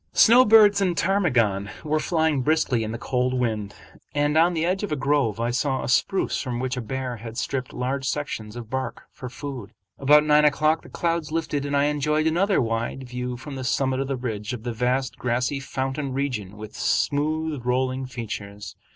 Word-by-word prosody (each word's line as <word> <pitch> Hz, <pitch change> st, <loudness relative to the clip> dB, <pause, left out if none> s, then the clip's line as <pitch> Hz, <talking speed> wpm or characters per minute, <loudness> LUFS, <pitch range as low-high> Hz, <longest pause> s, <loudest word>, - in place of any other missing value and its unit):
Snowbirds 220 Hz, -4 st, +7 dB
and 180 Hz, -3 st, +1 dB
ptarmigan 125 Hz, -, +1 dB
were 155 Hz, 0 st, 0 dB
flying 160 Hz, -4 st, +1 dB
briskly 130 Hz, -5 st, +1 dB
in 110 Hz, -, -4 dB
the 115 Hz, -, -4 dB
cold 125 Hz, +1 st, -1 dB
wind, 110 Hz, -5 st, -2 dB, 0.4 s
and 145 Hz, +1 st, +1 dB
on 170 Hz, +2 st, +4 dB
the 160 Hz, 0 st, 0 dB
edge 185 Hz, +2 st, 0 dB
of 205 Hz, -, -4 dB
a -, -, +1 dB
grove 135 Hz, -6 st, +1 dB
I 120 Hz, +1 st, 0 dB
saw 130 Hz, +1 st, 0 dB
a -, -, -3 dB
spruce 190 Hz, +9 st, +1 dB
from 125 Hz, -3 st, -3 dB
which 130 Hz, 0 st, -2 dB
a 125 Hz, -, -3 dB
bear 130 Hz, +1 st, -4 dB
had 115 Hz, +1 st, -9 dB
stripped 130 Hz, -2 st, -3 dB
large 135 Hz, +2 st, -2 dB
sections 115 Hz, -8 st, -4 dB
of 120 Hz, -2 st, -7 dB
bark 130 Hz, +3 st, -4 dB
for 125 Hz, -, -8 dB
food. 125 Hz, -5 st, -7 dB, 0.3 s
About 150 Hz, +2 st, +6 dB
nine 150 Hz, 0 st, +5 dB
o'clock 155 Hz, +2 st, +3 dB
the -, -, -14 dB
clouds 165 Hz, -3 st, -1 dB
lifted 150 Hz, -3 st, -2 dB
and 140 Hz, 0 st, 0 dB
I 140 Hz, -, +3 dB
enjoyed 150 Hz, +1 st, +1 dB
another 185 Hz, +5 st, +2 dB
wide 115 Hz, +2 st, -2 dB
view 125 Hz, 0 st, -4 dB
from 140 Hz, +3 st, -8 dB
the 130 Hz, -1 st, -5 dB
summit 130 Hz, 0 st, 0 dB
of 135 Hz, -, -1 dB
the 135 Hz, -1 st, -2 dB
ridge 110 Hz, -2 st, -4 dB
of 115 Hz, -3 st, -6 dB
the 120 Hz, -1 st, -3 dB
vast 125 Hz, +2 st, -1 dB
grassy 125 Hz, +3 st, 0 dB
fountain 135 Hz, +1 st, -3 dB
region 120 Hz, -8 st, -3 dB
with 105 Hz, 0 st, -9 dB
smooth 155 Hz, -1 st, 0 dB
rolling 130 Hz, +1 st, 0 dB
features. 105 Hz, -5 st, -7 dB
135 Hz, 195 wpm, -24 LUFS, 120-150 Hz, 0.4 s, Snowbirds